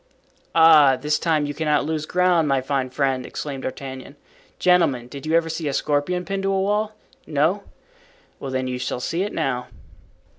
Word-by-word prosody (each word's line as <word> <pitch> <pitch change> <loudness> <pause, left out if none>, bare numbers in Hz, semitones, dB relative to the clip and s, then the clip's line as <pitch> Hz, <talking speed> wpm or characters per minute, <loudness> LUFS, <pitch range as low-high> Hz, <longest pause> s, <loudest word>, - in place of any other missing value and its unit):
"Ah, 155 -5 +7
this 150 +3 -1
time 155 -3 +1
you 145 - -4
cannot 150 -1 0
lose 155 0 -3
ground, 180 -3 +2
my 135 -1 +2
fine 130 0 -2
friend!" 130 -1 0
exclaimed 140 -3 -6
D'Artagnan. 130 +1 -7 0.4
"Gentlemen, 165 -9 +2
did 140 +4 -9
you 160 - +2
ever 165 -1 +3
see 160 -1 -3
a 140 - -1
scorpion 150 +6 0
pinned 195 +3 -3
to 195 0 0
a 195 - +1
wall? 210 +2 0 0.3
No. 160 +7 +1 0.7
Well, 135 - -6
then, 130 0 -2
you 125 0 -3
shall 125 0 -3
see 165 +7 -2
it 205 +2 -2
now." 125 -5 -2
150 Hz, 180 wpm, -22 LUFS, 135-170 Hz, 0.7 s, Ah